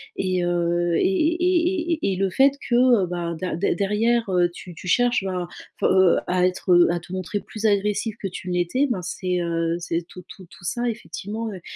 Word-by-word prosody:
et 185 -1 -1
heu 175 0 0
et - - +1
et 310 - +2
et 350 -1 +1
et 255 -12 -1
et - - -2
le 195 +1 0
fait 270 +8 +5 0.2
que, 240 - +2 0.3
heu, - - -1
bah, 170 -1 -3
dé 185 - -3
dé 190 - 0
derrière, 220 +3 +1
heu, 175 -1 +3
tu 180 - -10
tu 180 - -10
cherches, 240 +2 +2
ben, 185 -2 -3 0.4
heu, 190 -2 +5
à 180 0 +2
être 185 0 -2
heu, 175 0 +6
à 175 - -1
te 175 +2 -11
montrer 185 +2 -3
plus 220 0 -7
agressive 210 +1 +1
que 195 - -2
tu 185 0 -7
ne 180 - -1
l'étais, 180 +11 +1
ben, 195 -7 -1
c'est, 180 0 -2
heu, 165 -1 -1
c'est 170 0 -2
tout 180 - -12
tout 185 - -12
tout 175 - -17
ça, 240 +7 -1
effectivement, 220 0 -5
heu, 185 - -9
185 Hz, 220 wpm, -23 LUFS, 175-225 Hz, 0.4 s, heu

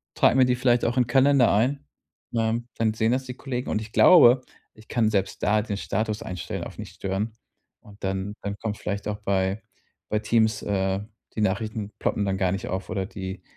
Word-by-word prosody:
trage - - +4
mir 130 -1 +6
die 125 0 +2
vielleicht 125 -1 +2
auch 120 +2 0
in 125 - +4
Kalender 135 0 +4
ein,“ 130 +7 +1 0.5
ähm, 115 +1 0
dann 110 -1 +1
sehen 110 +1 +1
das 130 +1 0
die 125 -1 -7
Kollegen. 125 -2 -4
Und 110 - 0
ich 110 0 -9
glaube, 130 -6 +7 0.3
ich 110 0 -18
kann 115 -3 +1
selbst 95 -2 -1
da 105 0 +3
den 105 -2 -4
Status 110 +2 -2
einstellen 90 -2 -5
auf - - -9
Nicht-Stören 100 +3 -4 0.5
und 105 0 -17
dann 95 +1 -2
dann 100 0 -4
kommt 105 -1 -4
vielleicht 100 0 -4
auch 105 0 -3
bei 95 0 0 0.5
bei 105 - +1
Teams, 110 0 +1
äh 95 -1 0 0.3
die 110 - -1
Nachrichten 105 +1 -1
ploppen 100 - 0
dann 95 -1 0
gar 95 -2 +2
nicht 95 0 -3
auf 95 +1 -4
oder 95 -1 -2
die 95 -1 -7
110 Hz, 200 wpm, -25 LUFS, 100-120 Hz, 0.5 s, glaube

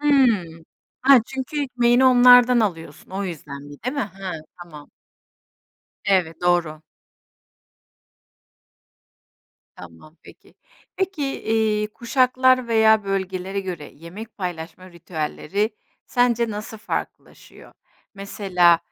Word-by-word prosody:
Hımm, 230 - +2 0.4
ha, 270 0 +7
çünkü 265 +3 -4
ekmeğini 245 -1 +2
onlardan 245 -1 +7
alıyorsun, 175 -7 -4
o 195 +1 -4
yüzdendi, 145 -4 -8
değil 250 +3 -2
mi? 250 -7 -2
He, 195 -1 -6 0.3
tamam. 150 -4 -13 1.1
Evet, 175 -5 +1
doğru. 170 -3 0 2.9
Tamam, 90 - -14
peki. - - -18 0.4
Peki, 380 -5 -2 0.2
iii, 220 -1 0
kuşaklar 255 +1 +2
veya 220 -1 +4
bölgelere 190 0 -3
göre 175 -6 -7
yemek 185 +9 -11
paylaşma 180 0 -7
ritüelleri 170 +4 -3 0.4
sence 240 -2 +1
nasıl 215 +1 -7
farklılaşıyor? 210 - -7 0.4
Mesela, 185 -4 +2
200 Hz, 90 wpm, -22 LUFS, 175-245 Hz, 2.9 s, ha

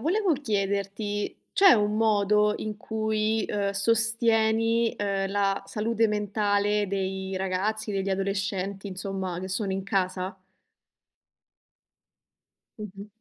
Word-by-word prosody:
volevo 365 - +1
chiederti 205 -4 -2 0.2
c'è 390 -2 +7
un 210 0 +1
modo 210 -1 +3
in 215 -1 -5
cui, 220 0 -1
uhm, 200 -1 -1
sostieni, 225 +1 +2
uhm, 195 -1 -1
la 200 -1 0
salute 225 +1 0
mentale 205 0 +1
dei 190 -1 -3
ragazzi, 205 +3 -2
degli 195 0 -1
adolescenti 195 0 -2
insomma 190 -2 -4
che 185 +1 -5
sono 195 +1 -1
in 190 0 -2
casa? 185 -1 -1 2.4
Mh-mh. 200 -1 -8
205 Hz, 105 wpm, -26 LUFS, 195-220 Hz, 2.4 s, c'è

